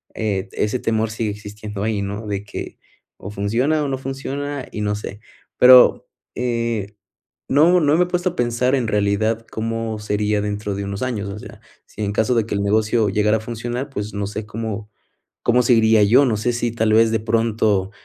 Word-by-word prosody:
eh, 100 -3 -2
ese 105 +4 -1
temor 110 -1 0
sigue 115 -1 -2
existiendo 105 0 -7
ahí, 110 -2 -1
¿no? 100 +2 -5
De 100 -1 -3
que 105 - -8 0.4
o 100 - -8
funciona 120 +10 0
o - - -1
no 135 - -2
funciona 135 +1 -5
y 105 - -5
no 105 0 0
sé, 105 0 -7 0.4
pero, 125 0 +7 0.3
eh, 115 -4 -2 0.5
no 165 +6 +5
no 150 0 +3
me 180 - +4
he - - -5
puesto 180 0 0
a - - -12
pensar 120 +2 +1
en 120 -4 -1
realidad, 110 +2 0
cómo 115 0 -3
sería 105 0 0
dentro 105 0 -3
de 100 - -4
unos 100 0 -5
años. 115 -6 -2
O 100 - -7
sea, - - -12 0.3
si 110 - -8
en 100 - -2
caso 110 +4 +1
de 115 -2 +2
que - - -4
el 100 - -1
negocio 110 +1 +2
llegara 105 +2 +2
a - - -8
funcionar, 120 +4 -4
pues, 105 -5 -5
no 100 0 -2
sé, 105 +1 -6
¿cómo, 110 -1 -5 0.5
cómo 125 +1 +4
seguiría 115 -3 +4
yo? 120 +7 +5
No 110 -4 +1
sé, 120 +3 0
si 120 -1 -2
tal 110 -2 +1
vez, 115 0 +5
de 110 - +1
pronto 110 -3 +1
110 Hz, 200 wpm, -20 LUFS, 105-120 Hz, 0.5 s, pero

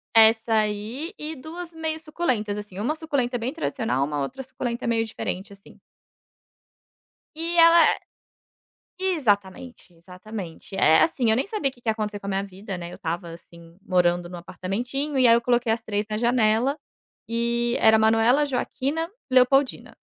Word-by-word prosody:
Essa 225 0 +5
aí 215 - -2
e 310 +1 -5
2 330 +4 -8
meio 320 -1 -3
suculentas, 255 -10 -2
assim. 205 -3 -8
Uma 285 +9 -1
suculenta 280 -6 -1
bem 245 +5 -3
tradicional, 230 - -1
uma 145 0 -2
outra 200 - -5
suculenta 245 -2 -5
meio 230 -1 +1
diferente, 200 -2 -5
assim. 195 - -17 1.6
E 335 +2 -1
ela 335 0 +8
é - - -13 1.0
exatamente, 245 - -1
exatamente. 180 +2 -9
Eh, 160 -3 +5
assim, 255 -8 +2
eu 220 - +4
nem 260 - 0
sabia 400 -10 -1
o 265 - -15
que 245 - -22
que 230 - -2
ia - - +5
acontecer 210 -1 -4
com 200 - -12
a - - -1
minha 195 0 -1
vida, 195 0 -7
né, 175 0 -7
eu - - -8
estava, 170 +1 -4
assim, 170 0 -14
morando 175 -2 +1
no 180 - -7
apartamentinho 250 - -3
e 255 - +5
aí 230 - +7
eu 235 - +2
coloquei 240 -1 +1
as 225 +1 0
3 205 -1 -2
na 215 - -2
janela, 235 +3 +2 0.5
e 235 +1 0
era 220 0 +6
Manuela, 225 +6 +4
Joaquina, 285 +4 -2 0.2
Leopoldina. 260 +2 +2
230 Hz, 170 wpm, -24 LUFS, 200-270 Hz, 1.6 s, ela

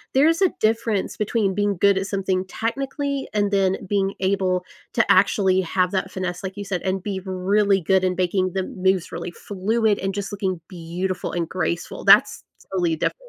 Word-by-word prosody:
there 275 +3 +6
is 330 +3 +2
a 380 - +5
difference 220 -2 0
between 210 -2 0
being 205 0 0
good 200 +3 +4
at 195 0 -1
something 190 -2 -1
technically 275 +6 -3
and 205 -1 +1
then 195 -1 +2
being 195 0 0
able 185 -1 0 0.3
to - - +2
actually 190 -3 +4
have 180 +1 0
that 190 -1 -1
finesse, 180 -1 -4
like 190 +1 -6
you 205 - -5
said, 190 -3 -2
and 190 -1 -2
be 195 -2 -3
really 195 +2 +2
good 190 +2 +2
in 185 -1 +1
making 185 0 +1
the 190 - -1
moves 185 -1 0
really 170 +1 -5
fluid 210 +4 0
and 195 0 -2
just 200 0 -4
looking 190 -3 -2
beautiful 180 +1 -4
and 170 -2 -1
graceful, 175 -1 -3
that's - - +5 0.3
totally 175 -4 +1
different. - - -1
190 Hz, 185 wpm, -23 LUFS, 185-205 Hz, 0.3 s, there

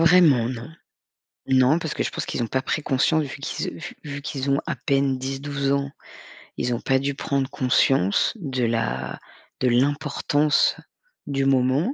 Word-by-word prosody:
vraiment, 165 -8 +5
non. 120 -2 -6 0.8
Non, 130 +4 +4
parce 160 -3 -4
que - - -1
je - - -2
pense - - -4
qu'ils 120 - -3
ont - - 0
pas 130 +3 -1
pris 155 - -2
conscience 155 +3 +2
vu 140 0 -7
qu'ils, - - -3
heu, - - -7
vu - - -8
vu 145 -1 -5
qu'ils 140 -1 -4
ont 140 - +3
à - - -1
peine 135 -3 0
10-12 135 +1 -3
ans, 140 0 0 0.7
ils 125 - 0
ont 120 - -2
pas 135 0 +2
dû 140 +1 -1
prendre 135 -1 -1
conscience 125 -6 +2
de 135 - -3
la 65 - -1 0.4
de 130 - +1
l'importance 145 +3 +2 0.5
du 135 -1 0
moment 135 - +2
135 Hz, 175 wpm, -24 LUFS, 130-145 Hz, 0.8 s, vraiment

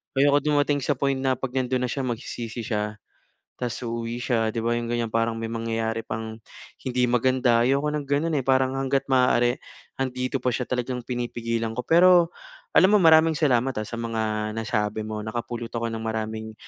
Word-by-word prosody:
Ayoko 140 +1 +4
dumating 145 0 +1
sa 140 +1 0
point 135 0 0
na 130 -1 +1
'pag 130 0 -5
nandun 130 -1 0
na 125 - -1
siya 135 -2 -2
magsisisi 120 -1 -5
siya 105 -1 -2 0.6
tapos 125 0 -4
uuwi 115 0 -3
siya, 115 -3 +1
'di 115 - -2
ba, 120 0 +1
'yong 120 - -4
ganiyan. 120 -2 -1
Parang 115 0 +1
may 115 - -3
mangyayari 115 0 -2
pang 110 0 -5 0.4
hindi 125 -1 -1
maganda. 125 -1 +3
Ayoko 140 +3 +2
ng 150 -2 -3
ganun, 150 +3 0
eh, - - -1
parang 130 0 +3
hangga't 135 0 0
maaari 125 -2 +3 0.4
'andito 130 0 -2
pa 125 - +2
siya 125 - -1
talagang 125 0 -2
pinipigilan 115 -2 -2
ko. 125 - -3
Pero 175 0 +6 0.4
alam 190 - +6
mo, - - +7
maraming 160 -1 +6
salamat 130 -3 +2
ha 110 - -1
sa 115 - -7
mga 110 -2 -2
nasabi 110 -1 -1
mo, 110 -1 -4
nakapulot 120 +1 -4
ako 115 -1 -2
ng 115 0 -5
maraming, 110 0 -4
120 Hz, 185 wpm, -25 LUFS, 115-135 Hz, 0.6 s, mo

